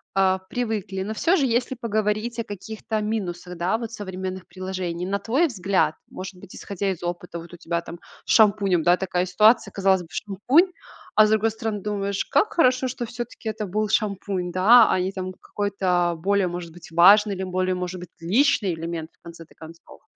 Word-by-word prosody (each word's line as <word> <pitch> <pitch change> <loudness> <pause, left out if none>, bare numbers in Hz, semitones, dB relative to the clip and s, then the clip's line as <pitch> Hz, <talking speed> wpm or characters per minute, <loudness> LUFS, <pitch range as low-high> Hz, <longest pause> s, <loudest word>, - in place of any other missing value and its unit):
а, 190 -1 +3
привыкли. 215 -5 -3
Но 215 +2 -4
всё 335 - +2
же, 280 - +2
если 245 +2 0
поговорить 220 0 -1
о - - 0
каких-то 215 +1 -5
минусах, 180 -5 -4
да, 185 +6 0
вот 230 -1 -6
современных 190 -3 -6
приложений, 185 -2 -4
на 200 +1 -1
твой 275 +12 +2
взгляд, 195 - 0
может 185 +1 -8
быть, 195 - -12
исходя 200 0 -3
из 175 - -7
опыта, 175 0 -5
вот 170 +1 -12
у 175 - -9
тебя 170 0 -2
там 170 0 -10 0.3
с - - -2
шампунем, 200 -5 +4
да, 175 +2 +4
такая 180 -1 -1
ситуация- 215 +6 +4
казалось 195 -1 +2
бы, 165 - -14
шампунь, 250 - +2 0.4
а 215 - +7
с - - +1
другой 220 +1 +3
стороны, 220 -1 -4
думаешь: 200 -1 -2
"Как 430 - +1
хорошо, 255 -5 +3
что 250 -1 -4
всё-таки 235 -1 -6
это 215 0 -4
был 210 +3 -1
шампунь, 195 -4 -1
да, 220 +6 +6
а - - +2
не 185 +1 -1 0.3
какой-то 185 -4 0
более, 200 -1 +2
может 175 -1 -6
быть, 175 -1 -14
важный 200 +5 +6
или 190 - -4
более, 185 0 -1
может 180 0 -4
быть, 180 - -9
личный 200 - +2
элемент 165 0 -5
в - - -40
конце-то 170 -1 -12
концов." 165 +1 -14
195 Hz, 190 wpm, -24 LUFS, 180-220 Hz, 0.4 s, а